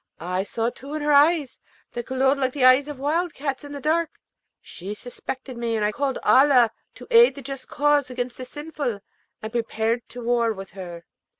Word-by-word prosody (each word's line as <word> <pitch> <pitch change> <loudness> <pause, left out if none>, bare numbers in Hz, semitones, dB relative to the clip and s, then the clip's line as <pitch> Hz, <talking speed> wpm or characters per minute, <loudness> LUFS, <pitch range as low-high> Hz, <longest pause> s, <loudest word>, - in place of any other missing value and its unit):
I 180 +3 -2
saw 230 +3 -1
too 280 +5 -9
in 305 - -3
her 295 - +2
eyes, 295 -1 +4 0.3
that 240 -1 -6
glowed 265 +1 +2
like 260 -1 0
the 270 -3 +2
eyes 255 +3 +6
of 295 -2 -6
wild 310 +5 -1
cats 275 -1 -3
in 290 - -9
the 285 - -6
dark, 320 +3 +1 0.5
she 195 +4 -8
suspected 255 +2 -7
me, 230 -1 -1
and 215 -1 +1
I 210 - +1
called 275 +3 -1
Allah 255 -4 +5 0.2
to - - -11
aid 470 +1 +7
the 280 - -9
just 270 0 -7
cause 290 -2 +2
against 250 -1 -4
the 255 - -6
sinful, 285 -6 -4 0.4
and 220 - -5
prepared 230 0 -1
to 245 +1 -8
war 235 -1 +2
with 195 -1 -9
her. 175 -3 -8
255 Hz, 200 wpm, -24 LUFS, 230-285 Hz, 0.5 s, aid